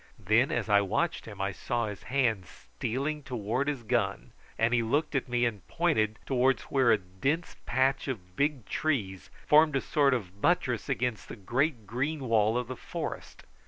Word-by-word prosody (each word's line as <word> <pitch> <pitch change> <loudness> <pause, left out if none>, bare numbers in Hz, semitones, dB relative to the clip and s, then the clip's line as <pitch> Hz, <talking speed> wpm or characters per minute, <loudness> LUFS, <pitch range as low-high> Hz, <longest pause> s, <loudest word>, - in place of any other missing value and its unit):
Then, - - +2
as - - -1
I 100 -1 +5
watched 135 - -1
him, 105 -3 -9
I 100 0 0
saw 120 +5 -2
his 105 -2 -6
hand 115 -9 +1
stealing 140 +6 -4
towards 125 +1 -2
his 135 -5 -4
gun, 110 -4 -1 0.3
and 115 +2 +2
he 120 - +3
looked 145 +8 0
at 135 -3 -1
me 120 0 +2
and 105 -6 -3
pointed 115 -11 +1
towards 130 0 +2
where 130 -3 +3
a 110 - +5
dense 100 - -2
patch 135 +1 +1
of 90 -9 -6
big 140 -3 0
trees 105 -12 -2 0.2
formed 155 -1 +5
a - - +3
sort 140 -3 +3
of 100 -4 -6
buttress - - +1
to - - +1
the 120 -4 -3
great 120 - -1
green 135 +8 -2
wall 115 -2 +2
of 125 -1 -2
the 130 - -5
forest. - - -6
120 Hz, 180 wpm, -29 LUFS, 105-140 Hz, 0.3 s, I